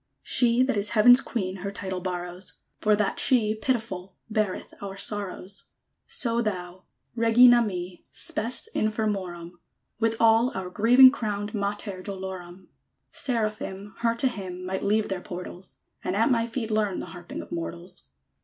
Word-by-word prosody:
_ - - -48 0.2
She 245 0 +4
that 260 -4 0
is 205 +1 +2
Heaven's 245 +4 +8
Queen 190 -8 -3
Her 195 +2 -4
title 190 -2 -4
borrows, 180 0 -5 0.3
For 210 0 +3
that 205 -1 0
she, 220 -5 +3
pitiful, 215 -5 -3 0.2
Beareth 215 -3 -1
our 195 -1 -6
sorrows. 200 -1 -5 0.4
So 235 -2 +1
thou, 185 -4 -4 0.3
Regina 240 +1 +6
mi, 180 -4 -4
Spes 235 - -3
infirmorum; 190 -6 -2 0.4
With 225 0 +1
all 230 0 +4
our 185 -1 -5
grieving 245 +6 +7
crowned 205 -5 -3
_Mater 200 -2 -3
dolorum! 190 -2 -7 0.4
Seraphim, 215 -5 -3
Her 230 0 +1
to 265 +3 +2
hymn, 185 -6 -6
Might 190 +1 -3
leave 210 +2 +2
their 190 -2 -3
portals; 180 +1 -9 0.3
And 185 - -1
at 225 +6 +3
my 230 -1 +2
feet 230 -1 -4
learn 210 -3 0
The - - -5
harping 175 -1 -7
of - - -16
mortals! 170 - -6
205 Hz, 150 wpm, -26 LUFS, 185-230 Hz, 0.4 s, Heaven's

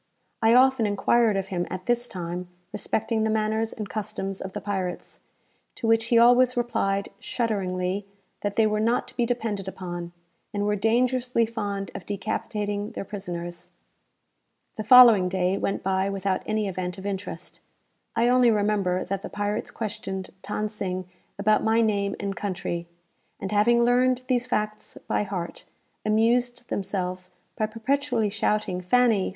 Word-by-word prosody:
I 225 +1 +5
often 255 -3 +5
enquired 210 +1 +3
of 195 0 -3
him, 175 -2 -2
at 185 0 -6
this 240 0 +1
time, 180 -2 -5 0.3
respecting 220 +2 -1
the 220 - +1
manners 220 +1 0
and 210 -2 -6
customs 195 -2 -4
of 190 0 -6
the - - -3
pirates; 190 -3 -4 0.6
to - - -5
which 225 0 +3
he 235 0 +3
always 245 +2 +6
replied, 200 -5 0
shudderingly, 195 -4 -2 0.3
that 205 0 -3
they 225 - +4
were 215 0 +1
not 230 +3 +1
to - - -16
be 240 - +1
depended 220 -5 -2
upon, 175 -2 -6 0.4
and 205 0 0
were 210 0 +2
dangerously 240 +2 +2
fond 205 -3 -4
of - - -8
decapitating 205 0 -3
their - - -5
prisoners. 175 -3 -6 1.1
The 215 - -4
following 230 -5 +8
day 185 0 +1
went 195 - -2
by 190 +1 +1
without 195 -1 -1
any 215 -1 0
event 180 0 -4
of 190 - -9
interest. 200 0 -5 0.6
I 230 +1 +3
only 250 -1 +5
remember 205 -4 +1
that 195 -1 -3
the - - -6
pirates 205 +1 -2
questioned 195 -4 -5 0.2
Than 215 - -1
Sing 185 -3 -4 0.3
about 210 +1 +3
my 220 +1 +3
name 200 -3 +1
and 200 -1 -3
country; 175 -3 -3 0.5
and, 195 - -4
having 235 +3 +4
learned 255 +1 +3
these 250 -1 +1
facts 215 -3 -3
by - - +1
heart, 190 -4 -5 0.4
amused 240 +3 +1
themselves 185 -2 -3 0.3
by 215 - 0
perpetually 230 0 0
shouting 210 -3 0
"Fanny! 225 +1 +3
210 Hz, 155 wpm, -26 LUFS, 190-230 Hz, 1.1 s, following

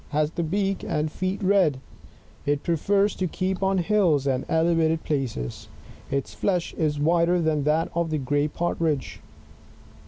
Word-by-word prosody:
— - - -25
has 150 0 0
the 170 - -3
beak 195 +4 -1
and 150 0 -1
feet 185 +4 -3
red; 185 -8 +3 0.7
it 145 0 +1
prefers 195 +5 +2
to 185 - -1
keep 185 +3 -2
on 195 0 +2
hUls 175 -6 +2
and 130 -2 0
elevated 160 -1 +2
places; 130 - -3 0.4
its 140 0 -2
flesh 180 -4 -1
IS 150 -2 -1
whiter 170 +3 +3
than 155 -3 0
that 155 +2 +1
of 170 -1 0
the 155 - 0
gray 145 +2 0
Partridge. 160 -3 -2
160 Hz, 155 wpm, -25 LUFS, 150-185 Hz, 0.7 s, red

